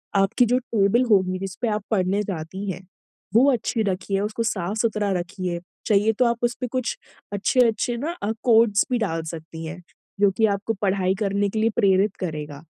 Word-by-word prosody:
आपकी 195 +5 +3
जो 245 +2 +2
टेबल 230 -1 +2
होगी 185 -2 +3
जिसपे 195 +5 -4
आप 210 -1 -1
पढ़ने 195 0 +1
जाती 190 +2 -5
हैं, 180 - -7 0.5
वो 260 +6 +6
अच्छी 235 -1 -1
रखिए, 195 0 -1
उसको 210 +3 -2
साफ़-सुथरा 210 0 -1
रखिए। 175 0 -4 0.3
चाहिए 215 +1 +3
तो 250 - +5
आप 235 0 +1
उसपे 240 +1 -1
कुछ 255 -1 -2 0.4
अच्छे-अच्छे 235 +3 +2
ना 305 +7 -2
अ, 210 - 0
कोट्स 225 -3 +4
भी 245 - +3
डाल 165 -7 -1
सकती 160 0 -8
हैं 175 +3 -7 0.4
जो 200 -1 +5
कि 220 - +4
आपको 210 +3 -3
पढ़ाई 190 -2 +1
करने 200 -1 0
के 220 - -3
लिए 225 - +3
प्रेरित 195 +1 +3
करेगा। 150 -4 -5
205 Hz, 175 wpm, -23 LUFS, 185-225 Hz, 0.5 s, वो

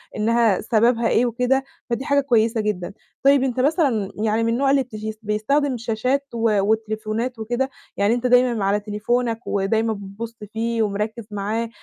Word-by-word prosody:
إنها 225 -1 +2
سببها 230 +1 +2
إيه 240 - +3
وكده، 250 +3 +1 0.3
فدي 240 +4 -2
حاجة 280 0 +3
كويسة 230 -3 +2
جدًا. 200 -3 -3 0.3
طيب 275 -1 +5
أنت 255 -1 -1
مثلًا 265 - +1
يعني 220 +1 0
من 230 0 +1
النوع 270 +2 +2
اللي 275 -1 +3
بتس 220 -4 -10 0.2
بيستخدم 250 +6 0
شاشات 250 +5 -1
و 230 -1 -3 0.2
والتليفونات 220 +3 -1
وكده؟ 240 +4 -1 0.3
يعني 205 +3 +3
أنت 245 +1 0
دايمًا 245 -4 +3
على 205 +1 +2
تليفونك، 225 +3 -2
ودايمًا 220 +3 +1
بتبص 205 +3 -8 0.2
فيه 230 0 0
ومركِّز 210 +2 -3
معاه 215 +3 -2
230 Hz, 155 wpm, -22 LUFS, 215-250 Hz, 0.3 s, طيب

